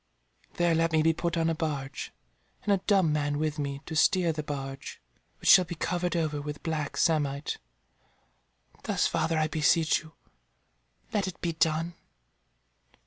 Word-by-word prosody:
There 175 -1 +2
let 165 +1 +2
me 155 -1 +4
be 165 0 +4
put 170 +1 -2
on 165 0 +2
a 165 - +2
barge, 145 -4 -4 0.5
and 205 - +2
a 195 - +1
dumb 190 -7 +4
man 145 -1 0
with 155 0 -1
me, 140 -1 -3
to 160 - -6
steer 175 +1 +3
the 155 - -3
barge, 135 -2 -6 0.4
which - - -5
shall 185 - +9
be 175 - -6
covered 175 +2 -1
over 155 -3 -1
with 150 0 -6
black 155 -3 -3
samite. 145 -3 0 1.3
Thus, - - +1
father, 165 0 0
I 155 0 +2
beseech 155 +1 +3
you, 160 -1 -15 1.0
let 200 -3 +1
it 185 - -7
be 170 -1 -2
done." 160 +1 +1
160 Hz, 160 wpm, -28 LUFS, 150-170 Hz, 1.3 s, shall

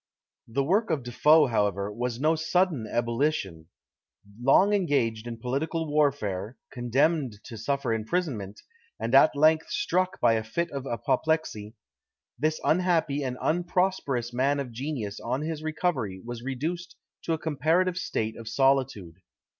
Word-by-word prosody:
The 130 +4 0
work 200 +10 +1
of 155 -6 0
De 120 - -7
Foe, 150 +5 +5
however, 105 -4 0
was 120 +2 -3
no 155 +3 +3
sudden 160 -6 0
ebullition: 115 - -1 0.7
long 185 +11 +5
engaged 120 - 0
in 115 -1 -5
political 140 +8 -2
warfare, 130 -8 0
condemned 130 +1 +1
to 115 - -9
suffer 125 +2 -1
imprisonment, 110 - -3 0.4
and 115 - -3
at 140 +2 +6
length 155 +2 +3
struck 185 - 0
by 115 - +4
a 110 -1 0
fit 170 +10 -2
of 140 -1 -5
apoplexy, 120 -2 -1 0.6
this 155 +3 0
unhappy 165 -4 +2
and 125 -1 -3
unprosperous 175 -8 0
man 140 +3 +1
of 130 -3 -4
genius 120 -4 -4
on 130 +5 -2
his 155 -1 -4
recovery 155 - -2
was 120 -1 -6
reduced 165 +8 -4 0.3
to 165 - 0
a - - 0
comparative 165 +4 +1
state 110 -10 -2
of 115 - -10
solitude. 120 -9 +1
135 Hz, 140 wpm, -27 LUFS, 115-160 Hz, 0.7 s, at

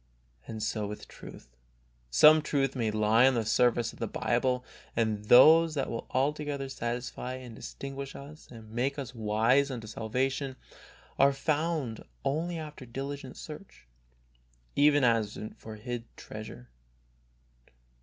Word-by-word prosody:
And 110 -1 -5
so 110 -1 -1
with 105 +1 -8
truth. - - -12 0.6
Some 155 - +7
truth 135 -3 0
may 115 -4 0
lie 110 +3 +4
on 135 - +3
the 115 -2 0
surface 120 +1 +2
of - - -16
the 115 - -2
Bible, 125 +3 0 0.3
but 110 -2 0
those 160 +5 +8
that 135 - -1
will 115 - -5
altogether 140 0 -1
satisfy 125 0 -4
and 125 -3 -9
distinguish 135 +3 -7
us 150 +3 -11
and 110 -2 -12
make 130 +5 -1
us 130 -3 -5
wise 115 +5 +2
unto 120 -4 -5
salvation 130 +5 -2 0.6
are 140 +1 +6
found 150 -4 -1 0.2
only 165 +5 -1
after 150 -3 -8
diligent 135 +2 -6
search, 150 - -10 0.9
even 145 0 +5
as 115 -3 +2 0.2
for 110 -1 -9
hid 115 +2 -5
treasure. 85 - -9
125 Hz, 135 wpm, -29 LUFS, 115-140 Hz, 0.9 s, those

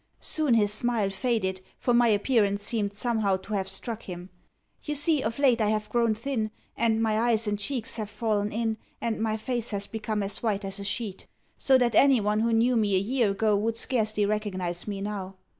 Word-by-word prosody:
Soon 300 -6 +3
his 205 -2 +3
smile 215 -3 0
faded, 190 -3 -1 0.2
for 245 - 0
my 240 0 +5
appearance 205 -2 +2
seemed 210 -3 +1
somehow 210 -2 0
to 195 +3 -9
have 195 -2 -1
struck 215 +4 -3
him. 180 0 -9 0.5
You 295 - -3
see, 295 0 +3
of 230 -1 -3
late 255 -5 +3
I 210 - +2
have 215 0 -2
grown 235 -2 +2
thin, 225 -1 -2 0.3
and 225 -1 +1
my 220 -1 +1
eyes 230 -1 +2
and 205 -1 -1
cheeks 240 +2 -2
have 215 -2 -4
fallen 210 -1 -1
in, 225 -1 -2 0.2
and 225 -2 -2
my 220 -1 0
face 240 +1 -2
has 200 -1 -3
become 215 -1 -3
as 195 0 -2
white 205 -3 -1
as 195 +1 -4
a - - -5
sheet; 200 0 -4 0.3
so 265 -1 +4
that 245 -2 +1
anyone 215 -5 +4
who 230 +1 +1
knew 235 +2 +3
me 210 -4 +2
a - - +4
year 225 +3 +1
ago 210 +2 +1
would 225 +2 -1
scarcely 215 -4 +1
recognise 185 -4 -2
me 200 -1 -4
now. 195 -2 -5
215 Hz, 205 wpm, -27 LUFS, 205-235 Hz, 0.5 s, my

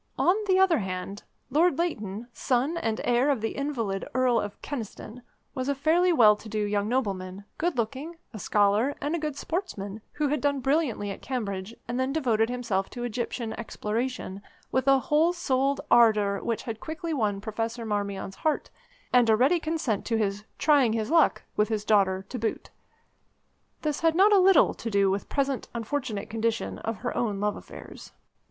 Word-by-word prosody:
On 360 - +4
the 375 -1 +4
other 380 -5 +4
hand, 190 0 -5 0.3
Lord 325 0 +3
Leighton, 220 - -2
son 260 +7 0
and 225 -9 -1
heir 245 +4 +2
of 275 -4 +2
the 225 +1 -3
invalid 235 -9 -2
Earl 255 -2 +3
of 205 -1 -5
Kyneston, 235 -2 -6 0.3
was 260 0 -3
a 280 - +1
fairly 330 +6 +3
well 220 -10 +6
to 220 - -11
do 215 - -3
young 205 0 0
nobleman, 200 -6 -2
good 340 -3 0
looking, 265 +9 -3 0.2
a 215 - -7
scholar, 210 +8 +2
and 290 +3 -2
a - - -2
good 300 -2 -3
sportsman, 220 - -4
who 295 -1 0
had 295 -2 0
done 285 -1 +1
brilliantly 265 -7 0
at - - -8
Cambridge, 210 -4 -4
and 240 +1 -2
then 260 +1 0
devoted 235 -7 +1
himself 230 -6 -1
to 240 - -6
Egyptian 235 -1 -3
exploration 225 -2 -3 0.3
with 260 +1 0
a 270 0 +6
whole 305 +6 +2
souled 275 -5 0
ardour 215 -4 +5
which 230 -2 -2
had 225 -2 -5
quickly 320 +3 -4
won 210 -7 0
Professor 225 +3 -4
Marmion's 200 -2 -3
heart, 310 -1 -1 0.4
and 245 -2 +5
a 220 - +6
ready 270 +10 +3
consent 310 -10 -1
to 230 - +1
his 205 -1 -1
"trying 280 -7 +4
his 225 +3 -2
luck" 330 -2 +4
with 210 +1 +2
his 215 -2 -2
daughter 195 -3 +2
to 255 - -5
boot. 225 0 -3 1.1
This 300 -2 -1
had 325 -1 +2
not 400 +4 +6
a 400 - +7
little 380 0 +5
to 230 - -5
do 200 -2 +3
with 195 +1 -3
the - - -12
present 275 -2 0
unfortunate 230 -3 -3
condition 225 +1 -2
of 225 -1 -3
her 245 - -2
own 210 -4 -1
love 210 0 0
affairs. - - -11
235 Hz, 185 wpm, -27 LUFS, 210-285 Hz, 1.1 s, a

